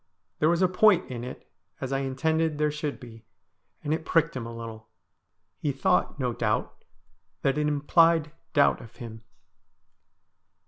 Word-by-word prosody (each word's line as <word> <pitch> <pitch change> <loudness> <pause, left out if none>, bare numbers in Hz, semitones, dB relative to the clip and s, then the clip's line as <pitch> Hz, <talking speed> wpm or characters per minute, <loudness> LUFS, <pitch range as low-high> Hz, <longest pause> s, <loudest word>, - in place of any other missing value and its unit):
There 155 - +4
was 170 +2 +2
a - - +6
point 185 -3 +4
in 120 -1 -5
it, 125 - -8 0.3
as 135 0 -3
I 135 - +1
intended 155 +4 0
there 150 0 +1
should 150 -1 -4
be, 115 -3 -12 0.6
and 150 0 0
it 160 - -2
pricked 165 -1 +2
him 120 -3 -4
a - - -7
little. 110 -1 -8 0.7
He 145 - 0
thought, 135 +2 +1
no 125 -2 0
doubt, 105 -2 -2 0.6
that 135 - +2
it 150 0 +1
implied 150 +2 +3 0.2
doubt 145 -1 +4
of 115 - -13
him. 115 -3 -9
145 Hz, 155 wpm, -27 LUFS, 125-160 Hz, 0.7 s, a